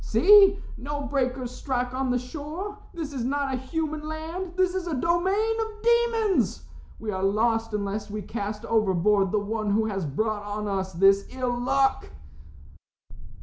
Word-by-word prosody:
"See, 390 - +6 0.2
no 285 +2 -4
breakers 255 -3 -1
strike 250 -1 -2
on 260 0 -1
the 250 - +2
shore. 310 +11 -6
This 315 -4 -6
is 255 -4 -3
not 275 +1 -1
a - - 0
human 305 +3 -3
land. 330 +4 -5
This 370 -1 +2
is 375 -2 -3
a 325 - -1
domain 375 - +1
of 435 -1 -6
demons. 465 -3 +2 0.4
We 220 -1 -4
are 190 -1 -3
lost 225 +3 +1
unless 205 +1 -3
we 210 0 -5
cast 210 0 -5
overboard 200 -2 +2
the 215 - +1
one 210 +1 -2
who 215 +2 +2
has 195 -6 -2
brought 215 +9 -1
on 205 +1 -4
us 190 -1 -2
this 195 +3 +4
ill 255 -2 -2
luck." 270 +2 +1
255 Hz, 160 wpm, -26 LUFS, 210-330 Hz, 0.4 s, See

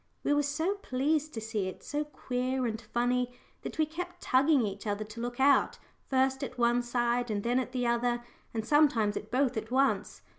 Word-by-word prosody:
We 290 - +2
were 290 - +3
so 320 +8 -1
pleased 300 +3 0
to - - -2
see 215 -3 -2
it 185 - -8
so 295 0 -2
queer 255 -2 -2
and 225 -1 -2
funny, 245 +1 0 0.3
that - - -6
we 315 - +3
kept 355 +3 -7
tugging 270 -1 +4
each 200 +1 -5
other 205 +1 -1
to 220 +2 -8
look 245 +1 -4
out, 280 +1 +4 0.3
first 265 +1 +2
at 255 -2 -5
one 240 0 +3
side, 240 0 0
and 205 -2 -1
then 245 +2 +2
at 255 - -3
the 250 -1 -1
other, 240 0 +1 0.3
and 220 -1 -3
sometimes 260 -9 +3
at 210 - -5
both 255 -1 +1
at 220 0 -4
once. 270 +2 +1
250 Hz, 200 wpm, -30 LUFS, 235-280 Hz, 0.3 s, tugging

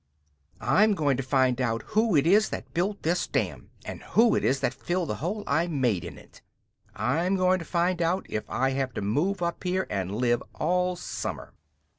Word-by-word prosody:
"I'm 200 - +3
going 145 -6 +1
to - - -1
find 130 -1 +1
out 115 -2 -1
who 215 -3 +3
it 145 0 +4
is 205 +5 +4
that - - -7
built 195 +4 -1
this 175 +3 0
dam, - - -2 0.2
and - - -7
who 230 0 +3
it - - +1
is 135 +1 +2
that - - 0
filled 175 -1 -2
the - - -1
hole 205 +6 -2
I 165 +2 +1
made 125 - 0
in - - -8
it! - - -17 0.5
I'm 160 - +1
going 185 0 +3
to 165 - -7
find 175 +1 0
out 175 +3 0
if 110 - -4
I 130 +1 +1
have 135 -2 -2
to - - -2
move 175 - 0
up 170 0 -3
here 185 +1 0
and 95 0 -2
live 120 0 +1
all 180 +2 +1
summer!" 175 - -6
170 Hz, 200 wpm, -27 LUFS, 130-185 Hz, 0.5 s, it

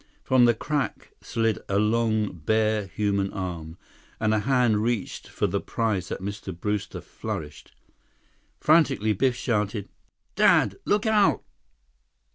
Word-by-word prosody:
From 130 -2 +4
the 120 -1 +4
crack 145 +3 -3
slid 115 -2 -1
a 100 - +1
long, 110 -1 +1
bare 110 +4 0
human 100 +2 -1
arm, 85 -3 -5 0.4
and 110 -1 +1
a 110 - +2
hand 120 -3 +2
reached 115 -2 -2
for - - -2
the - - -1
prize 105 -7 -2
that - - -5
Mr. 100 -3 -6
Brewster 105 +1 -3
flourished. 75 -3 -7 0.9
Frantically, 140 -9 +3
Biff 125 +5 +1
shouted: 105 -4 -2 0.5
"Dad! - - +4
Look 205 +1 +1
out!" 215 -2 +3
110 Hz, 125 wpm, -25 LUFS, 100-120 Hz, 0.9 s, From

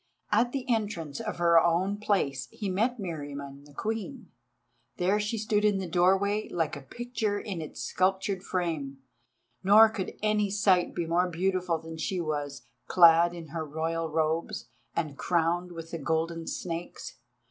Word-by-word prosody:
At 230 +4 +3
the 270 0 -4
entrance 205 - -1
of 220 -2 -4
her 170 -1 +6
own 180 +4 +1
place 145 -11 0
he 205 - -4
met 225 +7 +1
Meriamun 145 -6 -6
the 145 - -16
Queen. 225 - -4 0.7
There 190 +3 +2
she 210 +2 -1
stood 210 -1 +1
in 210 -2 +3
the 190 -1 -3
doorway 195 +5 +2
like 165 -3 -1
a 145 - -8
picture 220 - -3
in 190 -6 -5
its 155 - -7
sculptured 190 +1 0
frame, 160 -8 -2 0.7
nor 215 +3 +8
could 205 -4 -5
any 210 -1 +2
sight 195 -3 +2
be 175 - -1
more 175 +2 +2
beautiful 180 0 0
than 160 0 -9
she 185 +3 -1
was, 145 -3 -3 0.2
clad 170 0 +6
in 165 -3 -9
her 160 +1 -3
Royal 160 +2 -2
robes, 160 +1 -1 0.3
and 155 -4 -3
crowned 175 +1 +1
with 165 -1 -8
the 165 - -4
golden 165 +2 -1
snakes. 170 -5 -5
175 Hz, 160 wpm, -28 LUFS, 160-205 Hz, 0.7 s, nor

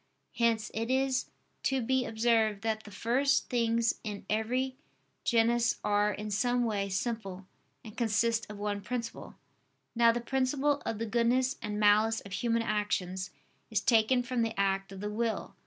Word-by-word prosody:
Hence 230 -2 +1
it 225 +2 -2
is 265 0 +1 0.3
to 270 0 +1
be 260 +2 0
observed 220 -2 +1
that 220 -1 -2
the - - -9
first 260 +7 +1
things 230 -1 +2
in 210 -2 -6
every 250 +5 0 0.5
genus, 235 0 +2
are, 205 0 +2
in 210 0 -5
some 245 +5 +1
way, 200 -3 -1
simple 195 -2 -3 0.4
and 215 -2 -11
consist 230 0 +1
of 210 - -8
one 205 0 -2
principle. 230 +2 -5 0.6
Now 235 0 +5
the 235 - -2
principle 270 +3 0
of 225 - -2
the 230 - -2
goodness 240 +3 +2
and 210 -1 -3
malice 215 +2 +4
of 200 - -12
human 230 +3 0
actions 190 -4 -1 0.4
is - - +1
taken 245 +1 +3
from 250 -1 -1
the 225 -2 -2
act 195 0 0
of 195 0 -8
the 210 0 -3
will. 225 +1 -2
225 Hz, 160 wpm, -30 LUFS, 210-240 Hz, 0.6 s, Now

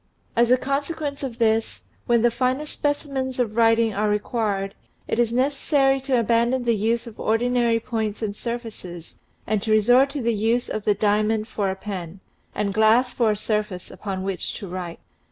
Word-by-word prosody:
As 235 0 +4
a 255 - +6
consequence 285 +2 -3
of 255 -4 -5
this, 225 -1 +1 0.2
when 235 -1 +3
the 240 - +4
finest 260 +5 -1
specimens 275 -3 -2
of 220 -4 0
writing 225 -1 +4
are 210 +1 0
required, 210 -2 -1 0.3
it - - -1
is 235 -1 +2
necessary 270 +1 +2
to 260 -2 +1
abandon 235 +3 +2
the 235 -1 +2
use 225 +3 0
of 230 -3 -11
ordinary 235 +1 +2
points 220 -2 -3
and 205 -2 -2
surfaces 220 -8 -7 0.3
and 215 -2 0
to 220 - -4
resort 245 +6 +5
to 280 0 -4
the 235 0 +2
use 225 +3 0
of 215 - -4
the 210 - +3
diamond 215 +1 +1
for 205 -5 -1
a 190 - -2
pen, 190 -3 -6 0.4
and 200 -1 -1
glass 220 +4 +4
for 230 -3 +2
a 210 - +1
surface 210 -4 -3
upon 190 -2 -5
which 195 -2 -3
to 200 - -7
write. 175 -2 -6
225 Hz, 180 wpm, -23 LUFS, 210-250 Hz, 0.4 s, a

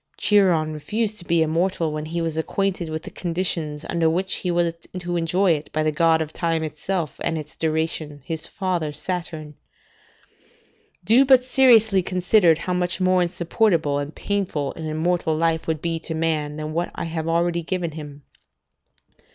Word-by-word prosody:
Chiron 175 -7 +3
refused 210 +8 -1
to 175 - -6
be 170 -1 +3
immortal, 165 0 0
when 150 0 -4
he 170 +2 -3
was 165 -1 -2
acquainted 180 +1 -1
with 155 0 -4
the - - -9
conditions 165 -4 -2
under 165 -1 +1
which 185 +4 0
he 180 - -3
was 170 -1 +1 0.2
to 175 -1 -3
enjoy 175 +3 +2
it, 150 -2 -2
by 155 - 0
the 155 - +1
god 160 +1 +3
of 155 0 -11
time 165 -2 -1
itself 155 +1 -3
and 165 - 0
its 150 -1 -8
duration, 155 -2 -2
his 160 -1 -4
father 180 -6 -2
Saturn. 155 -1 -4 1.5
Do 230 +8 +5
but 260 -2 +5
seriously 230 -6 +5
consider 180 -1 +3
how 180 +2 -3
much 180 0 -1
more 185 0 +3
insupportable 170 -3 +1
and 145 +2 -5
painful 180 -9 -2
an 160 -1 -6
immortal 160 0 0
life 165 0 0
would 160 -2 -2
be 165 -1 -1
to 160 0 -5
man 155 -2 -1
than 155 0 -5
what 170 +2 -1
I - - -4
have 165 -1 -3
already 170 +1 +1
given 170 0 -2
him. 145 -2 -9
165 Hz, 170 wpm, -23 LUFS, 155-180 Hz, 1.5 s, Do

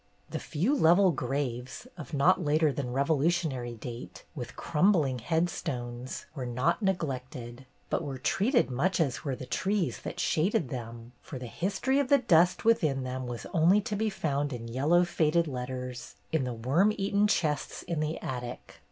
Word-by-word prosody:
The - - -2
few 185 - 0
level 180 - +5
graves, 130 - -3
of 150 -7 -9
not 170 +6 +3
later 155 0 +3
than 130 -3 -3
Revolutionary 140 -2 0
date, 120 +1 -8
with 125 -6 -7
crumbling 155 -6 +2
headstones, 130 -5 -2
were 130 -5 -4
not 130 - 0
neglected, 130 - -3 0.2
but - - 0
were 140 -3 -4
treated 210 - +2
much 165 +9 +1
as 140 -6 0
were 135 -3 -2
the 130 - -8
trees 190 +7 -1
that - - -6
shaded 160 -4 +1
them; 115 -1 -7
for 140 - -8
the 125 - -7
history 200 - 0
of 280 - +1
the 280 - +7
dust 180 -8 +3
within 155 -12 +3
them 130 0 -4
was 120 -1 -6
only 175 +5 +5
to 215 0 -3
be 220 +1 0
found 145 -6 -1
in 115 -2 -5
yellow 150 +9 +3
faded 165 0 +2
letters 125 -1 -5 0.2
in 160 -5 +1
the 125 - -3
worm 135 - +2
eaten 200 +1 +2
chests 150 -8 -1
in 170 -3 -3
the 155 +1 -1
attic. 125 -1 -6
145 Hz, 165 wpm, -29 LUFS, 125-175 Hz, 0.2 s, the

